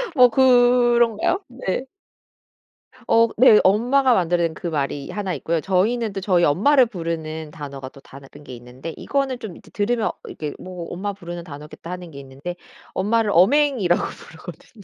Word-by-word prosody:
뭐 250 -2 +7
그런 245 -2 +4
가요? 380 - 0
네. 255 -1 -4 1.2
어 230 0 +4
네. 225 -2 +7
엄마가 245 +7 +3
만들어낸 170 -4 +1
그 175 - -6
말이 145 -3 -3
1 200 -3 -3
있고요. 165 -1 -2
저희는 210 +5 0
또 195 - -4
저희 185 -3 +2
엄마를 250 - +4
부르는 160 -6 -5
단어가 140 -3 -8
또 140 - -16
다른 135 0 -14 0.2
게 130 -3 -9
있는데 125 +6 -9
이거는 275 -3 -2
좀 210 -7 -8
이제 - - -18
드 - - -22
들으면 235 -3 0 0.2
이게 150 -2 -6
뭐 180 -2 -8
'엄마 200 +3 -4
부르는 175 -3 -8
단어겠다.' 150 +1 -11
하는 180 -2 -7
게 140 - -10
있는데 140 +6 -8 0.4
엄마를 215 +2 +1
어맹이라고 220 - +3
부르거든요. 175 +6 -11
185 Hz, 340 characters per minute, -21 LUFS, 160-235 Hz, 1.2 s, 뭐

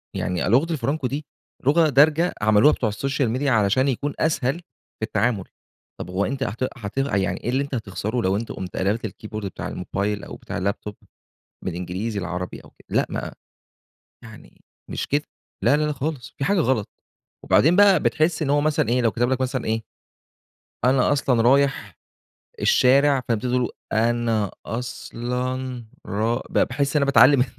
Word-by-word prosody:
يعني 90 -2 -1
أ - - 0
لغة 140 +9 +3
الفرانكو 140 -1 -1
دي 145 +4 -4 0.4
لغة 155 +3 +4
دارجة 155 +5 +4
عملوها 110 +7 +5
بتوع 110 - -1
السوشيال 135 +3 -1
ميديا 135 +4 0
علشان 110 +4 +3
يكون 140 +2 -1
أسهل 140 -4 +1 0.4
في - - -6
التعامل. 110 -2 0 0.5
طَب - - -6
هو 95 +3 0
أنت 135 0 -2
هت 115 +3 -3
هت 105 0 -7
يعني 105 -8 0
إيه 120 - -2
اللي 135 +3 +1
أنت 140 -1 -5
هتخسَره 110 +1 -3
لو 95 -2 +1
أنت 115 - -5
قُمت 90 -1 -6
قلَبت 105 +4 0
الكيبورد 110 +1 -6
بتاع 95 - -5
الموبايل 100 +3 -3
أو - - -8
بتاع - - -6
اللاب 100 +2 -1
توب 105 -1 -7 0.7
من - - -3
إنجليزي 95 +5 -3
لعربي 90 0 -5
أو - - -16
كده؟ - - -25
لأ - - +3
ما - - -4 0.9
يعني - - -14 0.3
مش - - -3
كده. 145 +1 +1 0.4
لا، 145 - +5
لا، 150 - 0
لا، 150 - 0
خالص 140 -3 -4
في 135 - -1
حاجة 195 +5 +2
غلط، 130 -8 +1 0.6
وبعدين 165 +5 +4
بقى 200 -4 +6
بتحس 155 +1 +1
إن 140 - 0
هو 145 +1 +3
مثلًا 150 -6 +1
إيه، 125 +2 +2
لو 115 - +3
كتب 120 +1 0
لك 130 - 0
مثلًا 130 -1 -1
إيه، 110 +1 -1 1.0
"أنا 130 +2 +3
أصلًا 130 -5 +2
رايح 135 +2 +2 0.6
الشارع." 135 +1 +4
فأنت 115 -3 0
تبتدي 125 0 +1
تقول، 125 - -1 0.2
أنا 115 -2 +1 0.2
أصلًا 125 +2 -4 0.2
را 110 +5 -1
ب - - 0
باحس 140 +3 +1
أنا 140 - +3
باتعلّم 140 -1 +6
125 Hz, 175 wpm, -23 LUFS, 110-140 Hz, 1.0 s, بقى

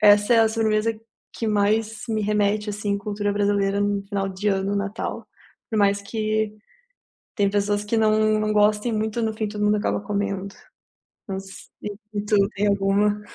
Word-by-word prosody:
essa 205 +1 +6
é - - +5
a 225 - +5
sobremesa 220 0 +1 0.4
que 230 - -2
mais 215 +2 +1
me 220 -1 0
remete, 210 0 +1
assim, 205 0 -3
em 200 - +1
cultura 205 0 -2
brasileira 200 -1 +1
no 205 0 +1
final 195 -1 -2
de 190 +2 -5
ano, 195 0 0
Natal. 200 +2 -4 0.4
Por 220 - -1
mais 200 0 +3
que, 215 +1 -1 0.8
tem 200 -3 +2
pessoas 205 0 0
que 210 +2 -1
não 215 0 +3
não 215 0 0
gostem 210 +2 +3
muito, 220 +2 -1
no 220 -1 0
fim, 215 0 -2
todo 210 0 -3
mundo 210 0 +4
acaba 205 - 0
comendo, 200 -1 -3 0.7
não 195 -2 -3
sei 195 0 -11 0.6
e 205 - -1
tu, 210 0 +2 0.2
tem 205 +1 +1
alguma? 200 +1 +2
210 Hz, 175 wpm, -23 LUFS, 200-215 Hz, 0.8 s, essa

